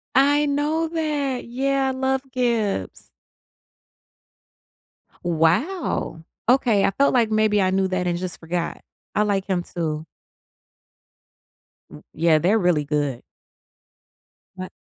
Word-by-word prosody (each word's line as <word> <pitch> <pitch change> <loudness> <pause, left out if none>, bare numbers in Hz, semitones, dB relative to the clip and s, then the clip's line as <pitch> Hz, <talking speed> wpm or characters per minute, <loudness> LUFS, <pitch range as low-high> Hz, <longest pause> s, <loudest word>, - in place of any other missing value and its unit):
I 285 +2 +4
know 295 +3 0
that. 295 -5 -2
Yeah, 270 +2 0
I - - +1
love 265 0 0
Gibbs. 230 - -1 2.1
Wow. 175 - 0 0.3
Okay, 240 -6 +4
I - - +3
felt 280 +7 +2
like 235 -3 +3
maybe 215 -1 +3
I 185 - +2
knew 190 0 +1
that 185 -1 -1
and 175 -1 0
just 180 -1 -5
forgot. 170 +1 -3 0.3
I 210 - +3
like 200 -2 0
him 185 -3 -1
too. 160 -3 -4 1.8
W - - -12
yeah, 160 0 +3
they're 195 +8 +3
really 175 -6 +2
good. 145 -4 -2 1.3
But 185 0 -6
205 Hz, 115 wpm, -23 LUFS, 175-265 Hz, 2.1 s, I